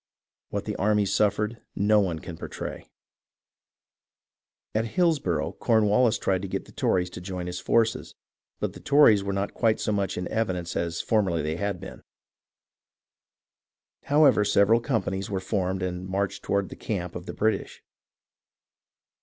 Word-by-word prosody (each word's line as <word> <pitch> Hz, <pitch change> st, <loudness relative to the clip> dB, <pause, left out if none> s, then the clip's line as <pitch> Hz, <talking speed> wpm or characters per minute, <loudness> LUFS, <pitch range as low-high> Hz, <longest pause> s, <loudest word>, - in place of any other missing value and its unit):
What -, -, -3 dB
the -, -, -3 dB
armies 105 Hz, 0 st, +2 dB
suffered 105 Hz, +2 st, +1 dB
no 105 Hz, +1 st, +4 dB
one 90 Hz, -5 st, 0 dB
can 85 Hz, +2 st, -8 dB
portray. -, -, -7 dB, 1.9 s
At 110 Hz, +1 st, +1 dB
Hillsborough, 150 Hz, -, +1 dB
Cornwallis 110 Hz, +1 st, +3 dB
tried 95 Hz, -2 st, 0 dB
to 100 Hz, -, -4 dB
get -, -, -4 dB
the -, -, -15 dB
Tories 90 Hz, -1 st, 0 dB
to 90 Hz, -, -8 dB
join 90 Hz, -1 st, -5 dB
his 90 Hz, 0 st, -4 dB
forces, 115 Hz, +4 st, +1 dB, 0.4 s
but -, -, -2 dB
the -, -, -11 dB
Tories 125 Hz, -9 st, +5 dB
were 100 Hz, -, -2 dB
not 100 Hz, +1 st, -2 dB
quite 110 Hz, -2 st, +2 dB
so -, -, -1 dB
much 100 Hz, -2 st, -1 dB
in 90 Hz, -, -3 dB
evidence 95 Hz, -6 st, -2 dB
as 85 Hz, -1 st, -1 dB
formerly 95 Hz, -8 st, +1 dB
they 80 Hz, +2 st, -2 dB
had 100 Hz, -1 st, -2 dB
been. -, -, -10 dB, 2.0 s
However, 140 Hz, -7 st, +5 dB
several 105 Hz, +2 st, +4 dB
companies 100 Hz, -6 st, -2 dB
were 95 Hz, -2 st, -1 dB
formed 95 Hz, -1 st, -1 dB
and 90 Hz, 0 st, -4 dB
marched 95 Hz, +1 st, -2 dB
toward 100 Hz, -1 st, -1 dB
the -, -, -8 dB
camp 90 Hz, -5 st, -4 dB
of 90 Hz, +1 st, -7 dB
the -, -, -5 dB
British. 110 Hz, +1 st, -1 dB
100 Hz, 150 wpm, -26 LUFS, 90-110 Hz, 2.0 s, Tories